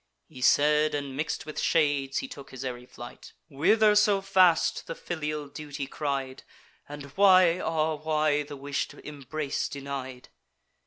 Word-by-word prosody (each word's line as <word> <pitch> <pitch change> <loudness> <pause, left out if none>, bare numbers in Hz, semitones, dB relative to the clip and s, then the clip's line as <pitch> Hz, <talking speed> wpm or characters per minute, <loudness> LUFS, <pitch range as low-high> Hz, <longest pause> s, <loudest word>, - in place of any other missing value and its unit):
He 130 - -12
said, 150 +3 +3
and 140 -2 -4
mix'd 155 +3 -3
with 155 - -6
shades, 145 - +1
and 265 - -8
took 140 -1 -10
his 130 0 -8
airy 125 -1 -6
flight. 120 -1 -11 0.2
"Whither 210 +10 +3
so 210 -1 +4
fast?" 185 -3 +3
the 165 - -5
filial 150 -3 -4
duty 145 0 -6
cried; 135 -2 -4 0.5
"And 145 0 -8
why, 185 -3 +5
ah 160 -2 0
why, 155 -1 +1
the 145 -1 -8
wish'd 140 +1 -4
embrace 145 0 -4
denied?" 135 -2 -7
150 Hz, 145 wpm, -27 LUFS, 140-160 Hz, 0.5 s, why